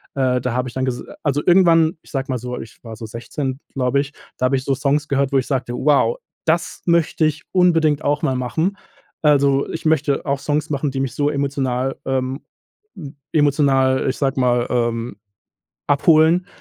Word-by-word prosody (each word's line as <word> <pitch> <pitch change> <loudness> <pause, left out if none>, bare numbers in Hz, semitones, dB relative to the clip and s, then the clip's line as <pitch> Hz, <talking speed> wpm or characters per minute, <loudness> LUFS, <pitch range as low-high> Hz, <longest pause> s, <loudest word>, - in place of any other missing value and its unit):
äh, 130 -2 +1
da 125 -1 -2
habe 125 +1 -1
ich - - -13
dann 130 - -2
gesa 125 -1 -3 0.2
also, 145 -1 +1
irgendwann, 170 -3 +4
ich - - -20
sage 135 -3 -2
mal 130 - 0
so, 125 +1 -5
ich 115 - -12
war 115 -1 -8
so 110 - -8
16 130 +4 -5
glaube 130 +1 +1
ich, 145 +1 -8 0.2
da 130 - 0
habe 135 - +1
ich 130 - -2
so 135 - 0
Songs 145 +2 0
gehört, 140 -1 0
wo - - +4
ich 130 - +1
sagte: 125 -3 -2
„Wow, 150 - +2 0.3
das - - 0
möchte 170 -2 +2
ich 155 0 -1
unbedingt 165 -5 +3
auch 145 +1 0
mal 130 - +1
machen. 160 +10 -1 0.5
Also, 140 -2 +3
ich 165 - -6
möchte 150 -2 +1
auch 140 -1 -1
Songs 150 +2 -1
machen, 145 +1 -1
die 135 - -3
mich 135 -2 -2
so 145 0 +1
emotional 135 -2 -1
ähm, 130 +1 -2 0.6
m 150 -4 -9 0.2
emotional, 140 -3 +3
äh, - - 0
ich - - -5
sage 135 -2 0
mal, 125 -1 +2
ähm, 115 -2 -1 0.7
abholen 160 +5 +4
140 Hz, 195 wpm, -20 LUFS, 130-150 Hz, 0.7 s, irgendwann